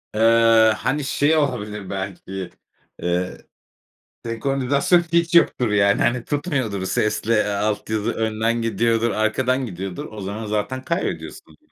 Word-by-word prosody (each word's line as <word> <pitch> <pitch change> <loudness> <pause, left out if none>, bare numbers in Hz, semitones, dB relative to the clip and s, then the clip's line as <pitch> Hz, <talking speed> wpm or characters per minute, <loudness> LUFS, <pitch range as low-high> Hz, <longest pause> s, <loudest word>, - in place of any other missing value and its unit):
Eee, 115 0 +5
hani, 150 +3 -1
şey 145 +3 +2
olabilir 105 -8 -2
belki, 95 -1 -5 0.5
eee, 90 +1 -1 0.9
senkronizasyon 135 +7 +1
hiç 170 0 +2
yoktur, 125 -8 +4
yani, 100 -1 +3
hani, 120 -1 +1
tutmuyordur, 135 - -2
sesle, 105 +3 0
eee, 105 -2 +2
alt 105 +1 -2
yazı 110 +1 0
önden 110 +1 -1
gidiyordur, 115 0 +1
arkadan 130 +4 0
gidiyordur. 95 -3 -6
O 110 -1 -8
zaman 100 +3 -5
zaten 105 +5 -2
kaybediyorsun. 170 - -4
115 Hz, 125 wpm, -22 LUFS, 105-130 Hz, 0.9 s, Eee